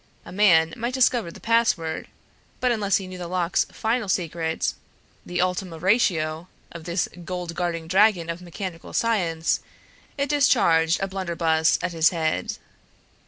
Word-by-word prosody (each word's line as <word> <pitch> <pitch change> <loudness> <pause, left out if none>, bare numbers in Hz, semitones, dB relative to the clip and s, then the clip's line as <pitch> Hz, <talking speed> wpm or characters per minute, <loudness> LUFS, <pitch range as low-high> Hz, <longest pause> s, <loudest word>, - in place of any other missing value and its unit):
A - - -10
man 170 -5 +4
might 240 +3 -3
discover 245 -6 +2
the - - -12
password; 225 -9 +1 0.5
but 250 -1 +2
unless 205 -4 +2
he 195 - -5
knew 185 0 -9
the 175 - -5
lock's 180 -1 0
final 225 -2 -2
secret, 165 -3 -1 0.5
the 175 0 -4
ultima 180 -1 -1
ratio 170 -4 +1 0.2
of 165 -1 -10
this 175 +1 0 0.2
gold 180 -1 -5
guarding 170 -2 -2
dragon 190 -1 +3
of 170 +1 -5
mechanical 175 -1 -7
science, 175 -8 +1 0.6
it 280 0 -1
discharged 170 - +3
a 195 - 0
blunderbuss 170 -4 +1
at - - -1
his 165 -1 +4
head. 160 -3 -2
180 Hz, 145 wpm, -24 LUFS, 165-205 Hz, 0.6 s, man